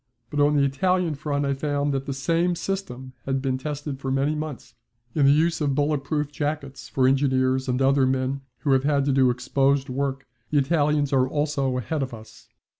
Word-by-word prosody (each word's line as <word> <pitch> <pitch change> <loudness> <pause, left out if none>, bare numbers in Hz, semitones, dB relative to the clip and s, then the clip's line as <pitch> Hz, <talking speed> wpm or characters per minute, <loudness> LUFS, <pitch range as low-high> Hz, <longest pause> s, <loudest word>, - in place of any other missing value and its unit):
But 150 - -2
on 145 +1 +4
the 140 - +4
Italian 175 +5 +1
front 145 0 -2
I 140 - +1
found 145 0 -1
that 135 +1 -3
the - - -2
same 165 +6 +1
system 130 -9 -5
had 135 0 0
been 130 -1 -1
tested 145 -1 -5
for 135 - -4
many 135 +3 +1
months. 150 -6 -6 0.4
In 145 -3 +3
the - - +7
use 165 +2 +2
of 140 -2 +1
bullet 145 -1 +1
proof 150 -1 -2
jackets 145 -2 -4
for 130 -1 +2
engineers 130 -1 +2
and 125 0 0
other 135 0 +4
men 130 +1 -1 0.2
who 145 - +1
have 140 +1 +3
to 140 - +2
do 130 -1 +4
exposed 135 +3 +1
work 135 +1 -2 0.2
the 150 - +1
Italians 145 0 +2
are 130 -1 +3
also 140 -3 0
ahead 140 +5 -2
of 130 -3 -3
us. 110 0 -15
140 Hz, 195 wpm, -24 LUFS, 130-150 Hz, 0.4 s, the